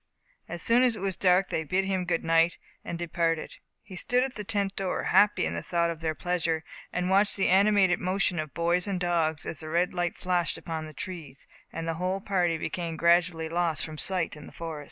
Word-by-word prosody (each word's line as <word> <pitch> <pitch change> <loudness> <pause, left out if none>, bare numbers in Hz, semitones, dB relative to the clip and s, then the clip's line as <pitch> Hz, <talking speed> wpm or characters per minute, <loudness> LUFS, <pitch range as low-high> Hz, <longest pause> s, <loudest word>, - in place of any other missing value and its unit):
Soon 230 +8 +3
as 250 -3 +3
it - - -7
was 195 -2 -1
dark 185 0 +3
they 160 - -1
bid 185 +5 0
him 190 -2 -1
good 170 -1 0
night, 165 +1 +3 0.3
and 170 - -5
departed. 165 -1 -1 0.3
He 190 - -11
stood 245 +7 +1
in 265 - -2
the 210 - -4
tent 200 -2 -1
door, 190 -2 -2
happy 210 - +4
in 80 - -2
the 85 - -3
thought 170 - 0
of 165 - -7
their 160 -1 -1
pleasure, 165 -2 -1 0.3
and 180 0 -1
watched 200 +2 +3
the 195 - +2
animated 195 -1 +4
motions 185 -2 0
of 155 -2 -9
boys 175 +3 +1
and 195 -2 -1
dogs, 165 -3 0
as 150 - -5
the 155 - -6
red 175 +3 +1
light 175 -1 -1
flashed 175 -3 0
upon 160 -1 -5
the 155 - -11
trees, 165 -8 -8 0.2
and 165 0 -5
the 165 - 0
whole 185 +2 0
party 180 -4 +1
became 165 0 -4
gradually 170 -1 +3
lost 165 -2 0
from 155 -1 -8
sight 185 -5 0
in 150 -1 -11
the - - -13
forest. 165 -2 -6
175 Hz, 215 wpm, -28 LUFS, 165-190 Hz, 0.3 s, happy